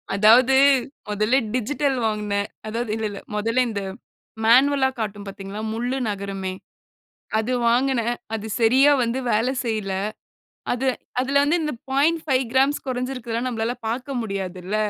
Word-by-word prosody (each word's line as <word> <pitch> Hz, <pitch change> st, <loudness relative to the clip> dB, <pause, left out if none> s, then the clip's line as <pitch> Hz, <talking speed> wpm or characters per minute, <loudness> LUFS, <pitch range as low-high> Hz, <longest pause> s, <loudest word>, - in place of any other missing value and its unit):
அதாவது, 235 Hz, +6 st, +6 dB, 0.5 s
மொதல்ல 215 Hz, +4 st, +1 dB, 0.2 s
டிஜிட்டல் 270 Hz, +2 st, 0 dB
வாங்கினேன். 210 Hz, -1 st, -1 dB, 0.2 s
அதாவது 230 Hz, 0 st, -3 dB
இல்ல, 220 Hz, -1 st, -3 dB
இல்ல. 200 Hz, -, -7 dB, 0.2 s
மொதல்ல 230 Hz, +4 st, +1 dB
இந்த 200 Hz, -2 st, -3 dB, 0.6 s
மேனுவல்ல 265 Hz, +3 st, +5 dB
காட்டும் 205 Hz, -1 st, -4 dB
பார்த்தீங்களா, 195 Hz, +1 st, -7 dB
முள்ளு 245 Hz, +3 st, -2 dB
நகருமே. 195 Hz, -2 st, -4 dB, 0.8 s
அது 220 Hz, +3 st, -1 dB, 0.2 s
வாங்கினேன். 240 Hz, -1 st, +1 dB, 0.2 s
அது 220 Hz, 0 st, -3 dB
சரியா 260 Hz, +6 st, +5 dB
வந்து 240 Hz, +2 st, 0 dB
வேலை 225 Hz, +4 st, +2 dB
செய்யல்ல. 215 Hz, -5 st, -2 dB, 0.8 s
அது 260 Hz, +2 st, -1 dB, 0.3 s
அதில 275 Hz, +2 st, +2 dB
வந்து 305 Hz, +5 st, +2 dB
இந்த 300 Hz, -3 st, -2 dB, 0.2 s
0.5 285 Hz, -2 st, +2 dB
கிராம்ஸ் 270 Hz, +3 st, +2 dB
குறைச்சு 255 Hz, +1 st, -2 dB
இருக்கிறதுலாம் 235 Hz, 0 st, -3 dB
நம்மளால 230 Hz, +1 st, -2 dB
பார்க்க 250 Hz, +2 st, -3 dB
முடியாது 195 Hz, -4 st, -4 dB
இல்ல. 200 Hz, +4 st, -3 dB
235 Hz, 135 wpm, -23 LUFS, 210-265 Hz, 0.8 s, அதாவது